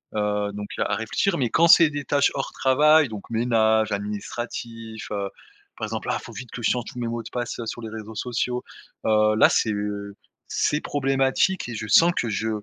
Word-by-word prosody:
heu, 105 -1 0
donc 105 0 -6
à - - 0
réfléchir, 170 - 0
mais 125 -4 0
quand 170 +7 +4
c'est 165 -1 +8
des 145 -2 -5
tâches 140 +2 +2
hors 135 - -3
travail 150 +3 +4
donc 105 -2 -8
ménage, 110 -2 +2
administratif, 110 +2 -5
heu, 100 -1 -2 0.5
par - - -4
exemple - - -5
ah - - +1
il - - -14
faut - - -10
vite 125 -2 -8
que 120 - -7
je - - +3
change 120 -2 -1
tous - - -10
mes 120 - -2
mots 115 0 -3
de - - -9
passe 120 -1 -4
sur 120 - -5
les 110 - -6
réseaux 110 0 -8
sociaux. 125 +2 -2 0.4
Heu, 110 0 +3
là 110 - +6
c'est 110 -2 +1 0.8
c'est 150 - +1
problématique 135 +5 +1
et 120 - -5
je 110 0 -5
sens 170 +9 +6
que 115 - -1
je 110 +1 -2
115 Hz, 205 wpm, -24 LUFS, 110-135 Hz, 0.8 s, c'est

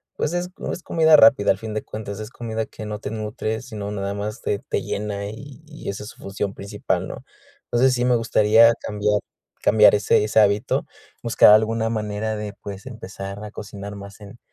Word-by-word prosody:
pues, 150 - -2
es 175 0 -2
no - - -4
es 175 - -8
comida 160 -1 +5
rápida 110 -6 +6
al 95 - 0
fin 110 +1 -6
de 110 - -2
cuentas, 105 -1 -7
es 110 0 -6
comida 110 -2 -4
que 110 - -10
no 105 0 -5
te 110 - -6
nutre, 110 0 -3
sino 110 -5 -6
nada 100 -1 -3
más 105 +1 -5
te 100 - -1
te - - -3
llena 100 -1 -4
y 135 +7 -11
y 155 0 -8
esa 100 +1 -5
es 105 - -8
su - - -14
función 100 0 -3
principal, 100 +1 -3
¿no? - - -8 0.4
Entonces, 130 +2 +3
sí 125 -1 0
me 125 -1 +4
gustaría 115 0 +5
cambiar 105 0 0 0.4
cambiar 105 -1 +6
ese 105 0 +3
ese 105 +1 +2
hábito, 105 0 +2 0.4
buscar 115 -2 +6
alguna 110 +1 +2
manera 110 0 -2
de, 105 -1 -5
pues, 100 -1 -8
empezar 100 -4 -8
a 105 - -8
cocinar 100 -1 -8
más 100 +1 -10
en 105 +3 -12
105 Hz, 200 wpm, -22 LUFS, 100-115 Hz, 0.4 s, rápida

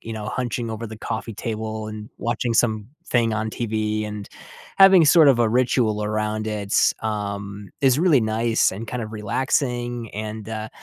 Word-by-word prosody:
you 115 - -7
know, 105 -1 -5
hunching 120 -1 -3
over 115 +1 -5
the 110 0 -9
coffee 110 0 -5
table 110 -1 -4
and 105 0 -8
watching 115 0 -1
something 115 - 0
on 110 0 -2
TV 110 -2 -2
and 105 -1 -7 0.5
having 195 -3 +8
sort 155 0 +6
of 125 -4 +5
a 115 - +3
ritual 115 -3 +1
around 110 0 -2
it, 105 -2 -4 0.3
um, 100 -1 -4
is 135 0 +4
really 160 -7 +4
nice 110 +1 +1
and 110 +4 -7
kind 125 0 -4
of 110 - -6
relaxing, 120 +1 -1
and, 110 0 -5
uh, 110 -1 -5
110 Hz, 165 wpm, -23 LUFS, 105-120 Hz, 0.5 s, having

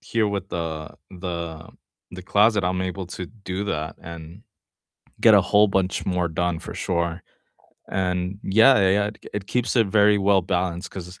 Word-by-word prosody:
here 115 -2 0
with 100 -2 -4
the 80 -3 -4 0.2
the 85 -3 -6 0.4
the 90 0 -8
closet, 105 +2 +3
I'm 90 0 0
able 95 0 -4
to 90 0 -6
do 100 -1 -6
that, 80 -5 -3
and 85 +3 -10 0.8
get - - +7
a - - +6
whole 105 +1 +4
bunch 95 -1 -1
more 90 -2 0
done 85 +1 -1
for - - -8
sure, 85 -1 -2 0.7
and 90 0 -1
yeah, 110 +7 +5
yeah, 95 -1 +4
yeah, 105 - +1
it 105 - -8
t - - -22
k - - -11
it 100 -1 -4
keeps 125 +3 -1
it 115 -3 +4
very 105 +1 +4
well-balanced, 95 -2 0
'cause 90 0 -9
95 Hz, 175 wpm, -23 LUFS, 85-100 Hz, 0.8 s, get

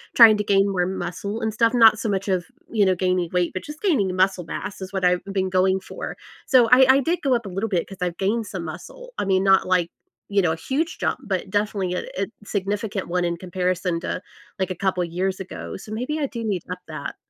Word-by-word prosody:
trying 225 -3 +9
to 210 - -1
gain 195 -1 +3
more 180 -2 +1
muscle 200 +3 -4
and 220 -1 -1
stuff, 230 +1 +2
not 225 -2 +7
so 225 - -2
much 195 0 -1
of, 185 -2 0 0.3
you 215 -3 +3
know, 190 -1 +3
gaining 180 -1 0
weight, 180 -1 +1
but 185 - -4
just 300 +1 -9
gaining 220 - +1
muscle 185 -1 +2
mass 195 +4 -6
is 190 0 -6
what 190 -2 -1
I've 180 0 +2
been 195 -1 -1
going 190 +1 +2
for, - - -7 0.3
so 250 -3 +6
I 250 +1 +8
I 265 +1 +7
did 335 +6 0
go 270 -3 +2
up 235 -2 -2
a 195 - -5
little 195 +5 -2
bit, 180 -4 0
'cause 195 - -10
I've 175 -1 -2
gained 215 +3 0
some 185 -3 -5
muscle. - - -9
I - - 0
mean, 190 -1 +2
not, 195 -1 +4
like, 180 -2 +2 0.4
you 200 -1 +3
know, 170 -3 +2
a - - -3
huge 290 - -2
jump, - - -1
but - - -2
definitely 205 -3 -1
a 180 - -3 0.2
a - - 0 0.2
significant 200 0 -2
one 180 0 0
in 170 0 -1
comparison 180 -1 -1
to, 180 - -4 0.4
like, 190 -1 0
a - - -3
couple 185 0 0
years 185 +3 -2
ago, 185 -1 -7
so 210 - -11
maybe 255 +8 -2
I 295 - +1
do 235 -4 -6
need 200 -5 -1
to 180 - -4
up 180 - -10
that. - - -6
195 Hz, 245 wpm, -23 LUFS, 180-220 Hz, 0.4 s, trying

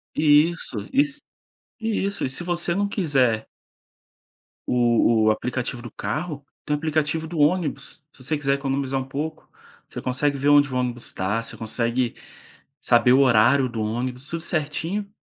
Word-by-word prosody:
Isso! 155 +3 +3 0.2
E 280 +2 +5
se 295 0 -5 0.6
isso 205 -3 -1
e - - 0
se 135 +6 -5
você 175 0 -1
não 200 +1 0
quiser 135 - +1 1.2
o 120 -2 +3 0.2
o 110 - +5
aplicativo 125 +1 -3
do 120 - -9
carro, 145 - -4 0.2
tem 150 - 0
o - - -2
aplicativo 155 +1 -1
do 165 -2 -5
ônibus, 150 -4 0
se 130 - -17
você 155 +3 -1
quiser 140 -1 0
economizar 135 -1 -2
um - - -3
pouco. 155 +4 -5 0.4
Você - - -7
consegue 140 +3 0
ver 140 +2 +1
onde 145 -2 +5
o - - 0
ônibus 125 -1 -2
tá, 100 +5 -1
você 115 - -6
consegue 115 +2 -1 0.7
saber 120 +1 +4
o 135 - +5
horário 130 +1 +4
do 115 -2 -5
ônibus, 125 +5 -3
tudo 165 0 -4
certinho, 165 +5 -2
140 Hz, 160 wpm, -23 LUFS, 125-160 Hz, 1.2 s, E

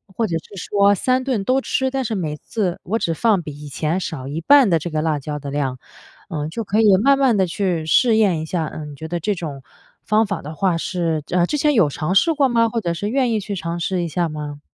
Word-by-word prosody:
或 230 - 0
者 165 -4 -1
是 180 - -12
说 200 0 +3
3 255 +5 +1
顿 250 -7 -1
都 260 +6 +2
吃， 265 0 0
但 265 0 -2
是 225 - -2
每 155 -7 -3
次 185 -2 -3
我 220 +6 -1
只 165 - 0
放 215 -1 +2
比 155 - -7
以 150 - -9
前 155 +5 -1
少 155 -8 -5
一 145 +4 -4
半 275 - +6
的 170 - +4
这 160 +2 -4
个 155 0 -1
辣 155 -1 0
椒 150 +1 -5
的 140 0 -7
量， 135 -3 -2 0.5
嗯， 150 -2 -3
就 230 - -3
可 210 +1 0
以 210 -3 +6
慢 275 0 +5
慢 265 -5 +3
地 190 -2 +2
去 175 -3 -1
试 230 +7 +4
验 195 -7 +3
一 - - -4
下， 160 -1 -2
嗯， 150 -1 -7
你 - - -10
觉 160 +3 -7
得 170 +1 -3
这 205 +5 0
种 145 -6 -6 0.4
方 215 +1 +2
法 200 -3 -4
的 150 +3 -7
话 185 -1 +1
是 165 -3 -2
呃， 175 -1 +2
之 295 - -2
前 295 +1 +2
有 195 - +4
尝 155 +4 -2
试 325 - +4
过 280 -3 +3
吗？ 230 -1 +3
或 230 0 -2
者 170 -4 -1
是 200 +5 -3
愿 255 -1 +1
意 220 - +1
去 205 0 -5
尝 170 -1 -4
试 180 +1 -1
一 - - -2
下 170 +1 -1
吗？ 150 -1 -6
180 Hz, 280 characters per minute, -20 LUFS, 155-220 Hz, 0.5 s, 半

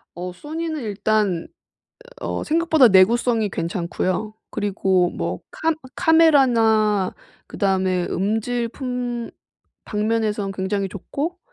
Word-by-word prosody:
어 180 +1 -5
Sony는 315 - -5
일단 210 -4 0 0.7
어 - - -3
생각보다 320 -4 +4
내구성이 220 +3 +4
괜찮고요. 185 +4 -2 0.2
그리고 190 -3 +1
뭐 85 +2 -4
캄 325 0 0 0.2
카메라나 230 - +4 0.3
그 - - -10
다음에 190 -2 +1
음질 225 +4 -1
품 245 -1 -4 0.5
방면에선 210 -2 -1
굉장히 195 +1 -2
좋고 285 - -5
215 Hz, 240 characters per minute, -22 LUFS, 190-245 Hz, 0.7 s, 생각보다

